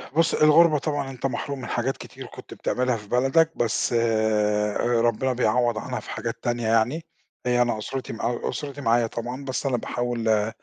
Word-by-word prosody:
بُص، 165 0 +3
الغربة 155 +1 +6
طبعًا 145 -2 -2
أنت 130 0 -6
محروم 135 +2 -3
من - - -6
حاجات 125 +3 -1
كتير - - -10
كنت - - -11
بتعملها 125 -1 0
في 105 -1 -12
بلدك، 135 +7 +3
بس 120 +1 0
آآ 105 -2 +1 0.2
ربنا 120 +3 +1
بيعوض 120 -1 +1
عنها - - -4
في - - -12
حاجات - - -3
تانية 120 -2 -1
يعني. 115 +9 +1 0.4
آآ، 125 0 +3
أنا 120 -2 +1
أسرتي 130 +5 -5
مع 120 +1 -2
أسرتي 145 -1 -5
معايا 115 -1 +3
طبعًا، 125 +5 -5
بس 130 +1 -3
أنا 130 -3 +1
باحاول، 120 -1 -3
آآ، 105 0 +2
120 Hz, 180 wpm, -25 LUFS, 115-135 Hz, 0.4 s, الغربة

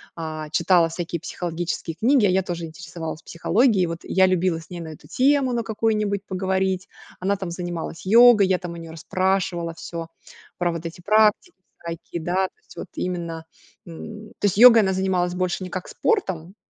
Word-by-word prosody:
а, 155 -2 -5
читала 170 +1 +4
всякие 170 0 -4
психологические 175 -2 -4
книги, 240 - +3
а - - +4
я 185 +1 +3
тоже 170 -2 -4
интересовалась 160 -1 -7
психологией. 205 +4 +2
И - - +1
вот 165 0 -5
я 190 0 +3
любила 185 -2 +1
с 160 - -15
ней 175 -1 -7
на 160 - -7
эту 155 - -12
тему 270 -1 +3
на 235 - 0
какую-нибудь 210 -2 0
поговорить. 190 0 -1 0.3
Она 195 +2 0
там 190 -3 -5
занималась 170 -1 -5
йогой, 230 0 +7
я 185 -1 +2
там 180 -2 -6
у - - -9
неё 165 -1 -9
расспрашивала 180 0 -1
всё 165 0 -6 0.5
про 175 -1 0
вот 165 0 -6
эти 170 +2 -7
практики 215 - +3 0.3
всякие, 170 0 -6
да, 185 +3 +1
то - - -29
есть 435 - -18
вот - - -6
именно, 170 -3 -4 0.4
м. 210 +6 -9
То - - -1
есть 200 -1 +1
йогой 235 0 +9
она 190 - +1
занималась 185 -2 0
больше 185 +1 -1
не 180 - -6
как 185 0 -5
спортом, 190 - -1
180 Hz, 185 wpm, -23 LUFS, 170-200 Hz, 0.5 s, йогой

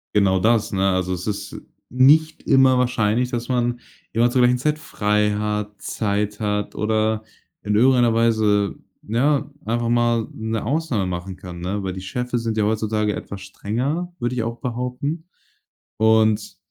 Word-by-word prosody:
Genau 95 -2 +3
das, 110 +2 +2
ne? 95 -1 +2
Also, 95 0 -1
es 90 +2 -5
ist 105 -1 -4 0.3
nicht 150 +6 +4
immer 135 -1 +5
wahrscheinlich, 125 0 +1
dass 120 0 -3
man 120 -1 0 0.3
immer 120 +2 +3
zur 125 - +2
gleichen 125 0 +4
Zeit 150 +4 -1
frei 105 -6 0
hat, 105 -1 -3
Zeit 105 -1 -2
hat 105 -1 -2
oder 110 0 0 0.4
in 105 0 0
irgendeiner 120 0 +4
Weise, 110 -3 +2 0.3
ja, 140 +7 0
einfach 115 +1 -1
mal 120 -1 +1
'ne 110 0 -3
Ausnahme 135 -5 -1
machen 90 +1 -5
kann, 90 -1 -9
ne? 95 +3 -3
Weil 95 - -2
die 95 - -6
Chefe 125 +6 -3
sind 115 -1 -2
ja 110 - +1
heutzutage 110 0 0
etwas 100 -1 -7
strenger, 130 - -3
würde 120 +1 -2
ich 120 - -1
auch 115 +1 -5
behaupten. 125 +7 -3 0.7
Und 110 -2 +2
110 Hz, 160 wpm, -22 LUFS, 105-125 Hz, 0.7 s, immer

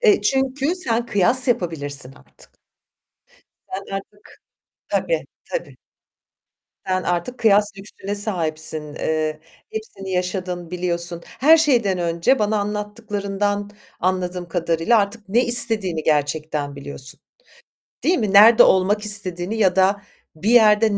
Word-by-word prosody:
E, 425 -5 +4
çünkü 270 +4 0
sen 235 -9 -1
kıyas 235 +5 +3
yapabilirsin 145 - -2
artık. - - -20 1.1
Sen 195 +1 -5
artık 205 +1 -12 0.5
Tabii - - -1 0.3
tabii. - - -4 1.1
Sen 185 -1 0
artık 180 +9 -2
kıyas 210 -2 +3
lüksüne 200 0 -7
sahipsin. 160 -7 -1
Eee, 155 0 -2 0.3
hepsini 195 -3 -7
yaşadın, 180 -1 -3
biliyorsun. 175 -1 -2
Her 315 +5 +4
şeyden 235 - +2
önce 170 +10 +1
bana 210 0 +1
anlattıklarından 205 -1 -3 0.3
anladığım 180 -1 -2
kadarıyla 170 +5 +1
artık 205 +1 -3
ne 235 +6 +2
istediğini 215 -9 +1
gerçekten 150 -1 -1
biliyorsun. 140 -1 -5 0.8
Değil 360 - +3
mi, 210 -5 -1
nerede 220 +4 +8
olmak 195 +3 +3
istediğini 195 -1 -2
ya 190 -4 +3
da 195 +1 +3 0.3
bir 195 +8 -2
yerde 215 -2 +5
195 Hz, 115 wpm, -21 LUFS, 170-220 Hz, 1.1 s, nerede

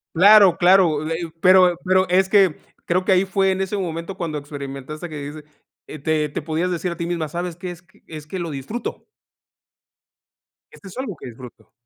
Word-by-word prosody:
Claro, 195 0 +7
claro, 175 -4 +4
eh 165 - -1
eh 165 - -8
pero 185 0 +5
pero 185 0 +2
es 185 +1 +3
que 190 -5 +4 0.3
creo 185 +2 +1
que 195 - +2
ahí 185 +1 +4
fue 195 0 +1
en 190 - -3
ese 190 +2 -2
momento 170 0 -4
cuando 165 -5 -4
experimentaste 145 +2 -7
que 155 - -8
dijiste, 145 +1 -8 0.4
eh, 155 - -9
te 155 +1 0
te 145 - -5
podías 160 +4 -2
decir 180 +1 -2
a 170 - -6
ti 170 0 -4
misma: 170 -3 -2
"¿Sabes 175 +2 -5
qué? 180 +1 -6
Es 175 0 -14
que 185 +1 -28
es 155 -2 -9
que 185 +5 -6
lo 170 -2 -4
disfruto". 145 - -6 1.7
Esto 200 - -13
es 190 - -11
algo 260 -9 -4
que - - -11
disfruto. 115 -2 -13
175 Hz, 200 wpm, -21 LUFS, 155-185 Hz, 1.7 s, Claro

